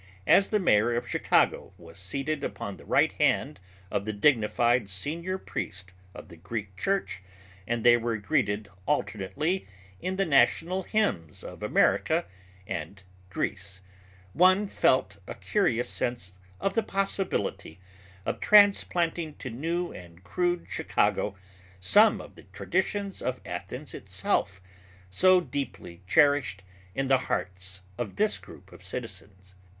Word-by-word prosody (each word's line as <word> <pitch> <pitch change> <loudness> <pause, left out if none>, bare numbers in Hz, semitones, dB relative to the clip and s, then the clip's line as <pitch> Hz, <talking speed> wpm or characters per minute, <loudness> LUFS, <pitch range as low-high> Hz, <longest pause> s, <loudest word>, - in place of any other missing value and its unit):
As 195 - +5
the 215 - +2
mayor 120 - +3
of 120 - -2
Chicago - - +1
was 85 +3 -13
seated 140 +11 -3
upon 100 -6 -5
the - - -15
right - - +3
hand - - +1 0.3
of 100 - -1
the 110 - -2
dignified 120 -1 +2
senior 165 - -3
priest 95 - -6 0.2
of - - -11
the 85 - -13
Greek 100 +2 -6
Church 195 - -1 0.5
and 120 -1 -1
they 120 0 +7
were 115 -1 -2
greeted 105 -3 0 0.2
alternately 150 - -1 0.3
in 185 +1 -2
the 195 0 +1
national 165 +4 +3
hymns 180 - -1
of - - -9
America - - +2 0.4
and 95 +1 -6 0.3
Greece, 95 0 -4 0.5
one 185 - +5
felt 100 - +2
a - - -6
curious 130 - 0
sense 120 -7 -3 0.3
of 195 - -1
the 225 - +2
possibility 195 - -2 0.5
of - - -2
transplanting 175 -6 +4
to 130 - -7
new 165 +8 -2
and 85 0 -12
crude 175 - -1
Chicago 100 - 0 0.4
some 90 0 +5
of - - -11
the - - -16
traditions 195 +2 -2
of 130 0 -2
Athens - - -6
itself, 90 -1 -2 0.5
so 185 - +5
deeply 125 - -6
cherished 130 -6 +3 0.3
in 135 0 -1
the 135 0 +5
hearts 95 0 -3 0.2
of 110 -5 -4
this 215 0 +1
group - - -15
of - - -14
citizens. 95 -1 -7
120 Hz, 135 wpm, -28 LUFS, -, 0.5 s, they